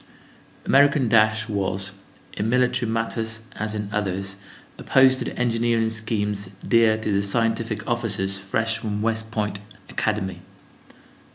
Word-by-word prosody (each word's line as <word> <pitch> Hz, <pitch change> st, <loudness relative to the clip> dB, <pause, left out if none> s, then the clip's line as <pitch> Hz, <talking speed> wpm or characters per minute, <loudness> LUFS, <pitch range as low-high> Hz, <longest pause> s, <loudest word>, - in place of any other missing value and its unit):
American 140 Hz, -1 st, +4 dB
dash 110 Hz, 0 st, +3 dB
was, 95 Hz, -2 st, -1 dB, 0.4 s
in 105 Hz, +2 st, -2 dB
military 125 Hz, -1 st, +2 dB
matters 115 Hz, 0 st, -1 dB, 0.2 s
as 110 Hz, +1 st, -2 dB
in 105 Hz, -1 st, -3 dB
others, 100 Hz, -1 st, -2 dB, 0.4 s
opposed 130 Hz, 0 st, +4 dB
to -, -, -3 dB
the -, -, -6 dB
engineering 115 Hz, -1 st, +1 dB
schemes 105 Hz, -3 st, -2 dB, 0.2 s
dear 115 Hz, -2 st, +4 dB
to 110 Hz, -1 st, -2 dB
the 100 Hz, 0 st, +2 dB
scientific 115 Hz, +1 st, 0 dB
officers 100 Hz, -5 st, -1 dB
fresh 110 Hz, +4 st, -1 dB
from 105 Hz, -1 st, -3 dB
West 110 Hz, -1 st, -1 dB
Point 105 Hz, -2 st, -2 dB, 0.3 s
Academy. 105 Hz, -3 st, -2 dB
110 Hz, 125 wpm, -23 LUFS, 105-115 Hz, 0.4 s, American